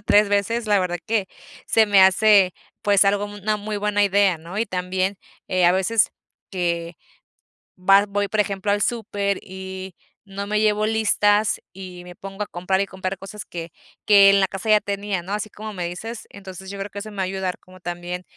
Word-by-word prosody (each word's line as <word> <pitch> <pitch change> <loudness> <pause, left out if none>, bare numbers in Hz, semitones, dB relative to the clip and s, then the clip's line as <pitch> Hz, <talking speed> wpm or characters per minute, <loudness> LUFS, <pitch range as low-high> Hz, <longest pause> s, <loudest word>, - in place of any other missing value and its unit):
3 205 0 +4
veces, 215 +3 0
la 205 -1 +3
verdad 175 -2 -1
que 220 -4 0 0.4
se 225 - +4
me 200 -1 +5
hace, 190 0 +5 0.3
pues, 200 -1 +4
algo 200 +1 +2
una 205 +1 -2
muy 210 0 -4
buena 205 0 +1
idea, 200 -3 +3
¿no? 170 +5 -9
Y 230 - 0
también, 185 +1 -2 0.3
eh, 185 -1 +2
a 175 - +5
veces, 205 +3 +2 0.4
que 170 -3 -2 0.8
va 195 +2 +5
voy, 205 0 -1
por 215 - -3
ejemplo, 200 0 -1
al 205 0 +2
súper 205 -4 -1
y 190 -1 -8 0.3
no 200 0 -6
me 210 +1 0
llevo 215 0 +2
listas, 215 -1 +2
y 180 -2 -9
me 180 0 -11
pongo 195 +2 -7
a - - -15
comprar 185 +2 -1
y 200 - +1
comprar 190 0 -5
cosas 200 +2 -8
que 170 -1 -7 0.4
que 200 -1 +8
en 200 - +5
la 190 - +4
casa 195 +3 -6
ya 210 - +7
tenía, 200 -2 -3
¿no?, 190 +3 -7
así 210 +1 -2
como 215 +1 -8
me 180 -3 -4
dices. 220 +6 -7
Entonces, 190 -1 -10
yo 200 - -7
creo 195 +1 -5
que 200 - -7
eso 215 +1 -7
me 205 - -12
va 190 - -1
a - - +1
ayudar 190 -1 -3
como 185 0 -18
también, 175 +1 -5
195 Hz, 205 wpm, -22 LUFS, 185-205 Hz, 0.8 s, que